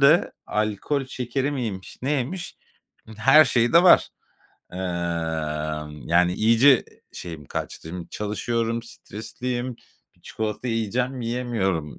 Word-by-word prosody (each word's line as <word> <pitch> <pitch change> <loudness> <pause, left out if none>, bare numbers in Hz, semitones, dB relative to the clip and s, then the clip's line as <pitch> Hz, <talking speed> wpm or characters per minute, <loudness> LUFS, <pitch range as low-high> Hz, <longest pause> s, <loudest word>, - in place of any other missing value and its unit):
de 150 +5 +5
alkol 110 +7 -1
şekeri 130 +2 -2
miymiş 110 -9 -4
neymiş, 150 +7 -2 0.6
her 135 +8 +7
şey 120 -3 +2
de 170 +1 +7
var. 180 - +7 0.6
Emm, 80 -4 -3
yani, 90 +1 +4
iyice 115 +6 +5 0.3
şeyim 80 -4 -7
kaçtım. 80 - -5
Şimdi 90 -2 -6
çalışıyorum, 115 +2 -2
stresliyim. 120 +2 -5 0.4
Bir - - -29
çikolata 110 +3 -4
yiyeceğim, 120 +3 -1
yiyemiyorum. 115 - -2
115 Hz, 105 wpm, -24 LUFS, 90-125 Hz, 0.6 s, her